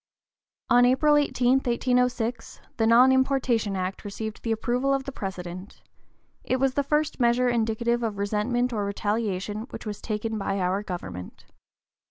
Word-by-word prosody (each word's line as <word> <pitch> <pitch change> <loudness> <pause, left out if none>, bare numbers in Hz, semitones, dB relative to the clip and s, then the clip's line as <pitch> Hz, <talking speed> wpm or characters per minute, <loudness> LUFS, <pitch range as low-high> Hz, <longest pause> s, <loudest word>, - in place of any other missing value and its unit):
On 245 0 +6
April 265 +4 +4
18, 265 -3 +3
1806, 245 -2 -1 0.2
the 225 -2 +2
Non 245 +3 +6
importation 260 -6 +1
Act 185 0 -3
received 215 +1 -6
the 230 - -2
approval 250 +5 +1
of 270 - -2
the 275 - -6
President. 185 -3 -7 0.6
It - - 0
was 265 0 +1
the 285 - +1
first 300 +2 0
measure 245 +1 +3
indicative 235 +1 0
of 220 -3 -2
resentment 220 +5 0
or 210 -2 -1
retaliation 205 +1 -2
which - - -9
was 210 -2 -5
taken 220 0 -3
by 195 0 -2
our 185 +2 0
government. 175 - -7
230 Hz, 150 wpm, -26 LUFS, 205-250 Hz, 0.6 s, On